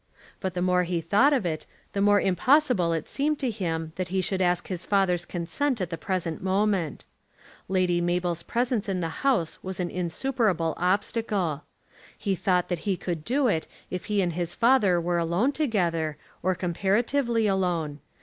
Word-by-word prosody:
But 190 -2 -3
the 180 - 0
more 180 0 +3
he 175 -1 -1
thought 205 - +4
of 265 -9 +1
it, 160 -2 -3 0.3
the 200 - 0
more 205 0 +5
impossible 200 - +3
it 165 -2 -2
seemed 300 +2 0
to 260 -4 -1
him 165 -6 -3
that 185 -1 -2
he 190 +1 -1
should 190 0 -1
ask 180 -1 +1
his 180 -2 -4
father's 180 -4 +1
consent 230 - -1
at 180 -2 -3
the - - -1
present 170 -4 -2
moment. 190 -4 0 0.6
Lady 180 -2 +2
Mabel's 175 -1 0
presence 235 0 -1
in 190 -1 -1
the 165 - -1
house 240 - +1
was 190 -1 -5
an 175 -1 -2
insuperable 180 -1 0
obstacle. 185 - 0 0.5
He 200 - -1
thought 180 0 +1
that 175 -2 -1
he 190 - +1
could 170 -4 -4
do 260 - +1
it 160 -8 0 0.2
if 180 - -4
he 205 -2 +1
and 175 -2 -1
his 175 0 -3
father 230 -7 +4
were 175 0 0
alone 175 +11 +1
together, 175 - 0 0.2
or 185 +1 +1
comparatively 225 +7 +1
alone. 175 -7 0
185 Hz, 175 wpm, -26 LUFS, 170-215 Hz, 0.6 s, more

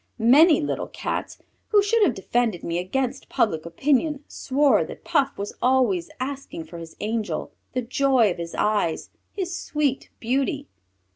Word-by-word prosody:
Many 280 +8 +6
little 290 - -2
Cats, - - -4 0.3
who 410 -2 +4
should 450 +3 +2
have 315 - +4
defended 225 -1 -1
me 170 +1 -1
against 260 +8 -2
public 165 -6 0
opinion, 285 - +1
swore 280 +1 +2
that - - -10
Puff 275 0 +1
was 200 +1 -4
always 245 -9 +2
asking 265 -9 -5
for 170 +2 -10
his 165 -1 -10
angel, 220 0 -2 0.2
the 255 -1 -1
joy 250 -3 +3
of 175 - -5
his 170 0 -5
eyes, 205 -6 0 0.2
his 365 -3 -3
sweet 290 -5 -1
Beauty! 275 +4 -1
255 Hz, 150 wpm, -24 LUFS, 200-280 Hz, 0.3 s, Many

